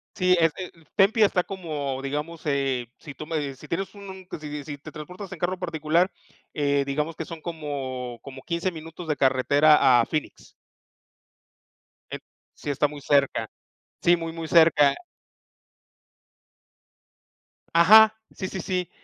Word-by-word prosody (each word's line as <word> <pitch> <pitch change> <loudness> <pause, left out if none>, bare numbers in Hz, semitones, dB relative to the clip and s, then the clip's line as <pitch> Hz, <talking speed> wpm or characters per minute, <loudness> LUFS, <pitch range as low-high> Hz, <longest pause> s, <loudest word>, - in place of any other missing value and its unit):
Sí, 185 -1 +3
es 165 -1 +4
eh, 185 -1 -5
mm, 165 - -21
Tempe 210 +3 +4
está 185 -3 +2
como 150 -8 -4
digamos, 150 +4 -4
eh, 135 -4 0
si 150 -3 -10
tú 155 - -8
me 150 -4 -3
si 145 +3 -14
tienes 195 +6 -3
un 190 -2 -10
si 150 - -7
si 145 -1 -6
si 145 0 -7
te 140 - -11
transportas 180 +5 -9
en 190 - -7
carro 180 +3 -1
particular, 170 +1 +1 0.4
eh, 140 -1 +1
digamos 150 +3 -2
que 165 - -4
son 165 0 -9
como 135 -7 -5
como 135 -1 -10
15 170 +2 -2
minutos 165 +1 -9
de 150 - 0
carretera 135 0 +4
a - - +2
Phoenix. 155 -1 -5 1.6
En - - -5 0.3
Sí, - - -6
está 145 +1 +1
muy 145 0 -9
cerca. 140 -1 +2 0.6
Sí, 175 - +5
muy 165 -1 -5
muy 165 0 -6
cerca. 160 -4 +5 2.8
Ajá, 215 +6 +8 0.2
sí, 190 - -5
sí, 190 - -5
sí. 180 -1 -2
155 Hz, 150 wpm, -25 LUFS, 140-175 Hz, 2.8 s, Ajá